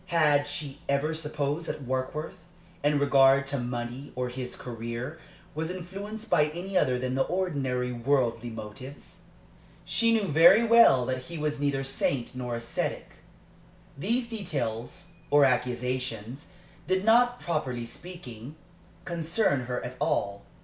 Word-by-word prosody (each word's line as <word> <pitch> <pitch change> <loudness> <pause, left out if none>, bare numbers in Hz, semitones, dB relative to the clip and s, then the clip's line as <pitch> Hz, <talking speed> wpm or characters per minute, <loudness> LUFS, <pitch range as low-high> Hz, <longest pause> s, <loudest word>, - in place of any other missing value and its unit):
Had 150 -4 +3
she 145 -1 -3
ever 140 +3 +1
supposed 150 0 -2
that 145 - -4
Warkworth, 140 +7 -3 0.4
in 145 0 +3
regard 140 -1 +5
to 140 0 -2
money 120 +2 -4
or 125 0 -2
his 125 0 -5
career, 120 +5 -6 0.3
was 160 +2 -3
influenced 195 +5 -6
by 150 -8 +4
any 175 +6 -6
other 130 -8 +3
than 130 0 -2
the 135 - +1
ordinary 135 -9 -1
worldly 120 -1 0
motives? 110 +5 -9 0.7
She 230 0 +3
knew 225 -2 +3
very 170 +8 +7
well 230 - +6
that 130 0 -3
he 170 -1 -7
was 150 -1 -2
neither 140 -1 0
saint 135 -2 -1
nor 125 -2 -3
ascetic. 115 0 -3 0.8
These 235 - -1
details 165 - -4 0.2
or 145 0 +6
accusations 125 0 -1 0.4
did 185 +2 +1
not, 245 +2 +5
properly 130 -8 -2
speaking, 140 -2 -10 0.5
concern 165 - +1
her 125 -1 -3
at 125 +1 -7
all. 100 0 0
140 Hz, 135 wpm, -28 LUFS, 125-165 Hz, 0.8 s, very